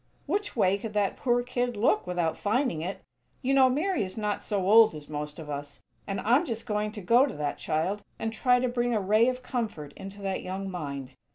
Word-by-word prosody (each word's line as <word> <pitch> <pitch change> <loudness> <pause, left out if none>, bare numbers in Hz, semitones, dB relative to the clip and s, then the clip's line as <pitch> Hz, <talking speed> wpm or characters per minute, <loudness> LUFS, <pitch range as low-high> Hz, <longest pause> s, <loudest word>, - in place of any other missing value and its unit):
Which 405 +7 -2
way 200 -3 +3
could 220 +1 -6
that 205 -2 +1
poor 245 -1 +1
kid 245 -2 -2
look 205 -3 +2
without 175 -3 0
finding 220 - 0
it? 185 +4 -5 0.4
You 265 +2 +2
know 265 -1 +6
Mary 335 +8 0
is 185 +2 -6
not 210 -1 -1
so 195 -3 -1
old 220 -3 +7
as 150 -1 -9
most 150 0 -5
of 160 -3 -8
us; 145 0 -6 0.3
and 195 -1 -2
I'm 245 +9 +4
just 230 -8 -4
going 210 -2 -1
to 210 - -7
go 240 +9 +5
to - - -5
that 145 -1 -3
child 180 +7 -1 0.2
and 225 0 -3
try 250 +2 +3
to 255 - +1
bring 240 -1 0
a - - +2
ray 215 +4 +4
of 255 0 -4
comfort 210 - -4
into 195 +1 -9
that 195 -1 -1
young 190 +1 -4
mind. 140 -6 -5
210 Hz, 220 wpm, -28 LUFS, 180-245 Hz, 0.4 s, old